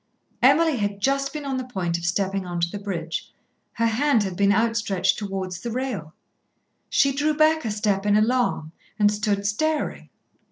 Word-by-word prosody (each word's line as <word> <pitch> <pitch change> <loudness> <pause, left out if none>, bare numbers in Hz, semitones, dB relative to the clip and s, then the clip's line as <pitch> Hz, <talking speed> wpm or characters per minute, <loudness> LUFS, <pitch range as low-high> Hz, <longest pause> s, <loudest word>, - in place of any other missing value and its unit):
Emily 285 +3 +4
had 205 -2 -1
been 200 - -17
just 275 +6 0
on 275 -3 -3
the 255 - -2
point 185 -9 -3
of 170 0 -4
stepping 195 +1 0
on 175 -1 -4
to 170 - +2
the 205 - -5
bridge, 170 -5 -4 0.4
her 230 - 0
hand 235 +1 +2
had 190 -3 -4
been 200 +1 +3
outstretched 210 -3 +1
towards 190 -3 -4
the 235 - -5
rail. 230 -10 -4 0.7
She 275 -2 +3
drew 300 +3 0
back 310 0 +3
a - - 0
step 205 -1 0
in 205 - +4
alarm 220 -8 +1 0.3
and 210 -1 +4
stood 210 -1 -1
staring. 310 +9 -1
210 Hz, 175 wpm, -24 LUFS, 195-265 Hz, 0.7 s, Emily